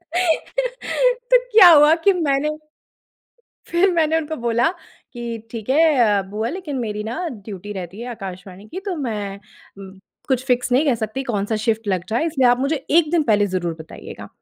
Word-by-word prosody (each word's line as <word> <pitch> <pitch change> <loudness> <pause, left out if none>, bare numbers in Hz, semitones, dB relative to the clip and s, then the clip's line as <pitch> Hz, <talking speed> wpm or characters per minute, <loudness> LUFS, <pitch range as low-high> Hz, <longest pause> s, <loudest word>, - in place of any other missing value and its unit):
तो - - +1
क्या 420 -5 +9
हुआ 300 0 +7
कि 400 - +6
मैंने 300 -4 0 1.2
फिर 360 +3 +3
मैंने 320 -2 +2
उनको 315 -1 -3
बोला 235 +2 +1 0.4
कि 235 -2 -5
"ठीक 225 -1 -7
है 315 +3 +4
अ, 210 -4 +3
बुआ, 215 +3 -2
लेकिन 310 -2 -5
मेरी 210 -3 -3
ना 290 +11 -3
ड्यूटी 205 - -8
रहती 190 +1 -7
है 240 - -6
आकाशवाणी 195 -2 -9
की, 370 - -6
तो 390 -2 -4
मैं 210 -8 -4 0.9
कुछ 260 -1 0
फिक्स 250 -1 0
नहीं 265 +5 +4
कह 275 -5 +2
सकती 220 +3 -4
कौन-सा 220 -4 -2
शिफ्ट 225 -1 0
लग 185 -3 -1
जाए। 230 +7 0
इसलिए 270 -6 +2
आप 245 0 +3
मुझे 280 +4 0
एक 315 -1 +4
दिन 340 -2 +2
पहले 210 -6 +2
ज़रूर 175 -2 -1
बताइएगा। 160 - -10
250 Hz, 170 wpm, -21 LUFS, 215-320 Hz, 1.2 s, क्या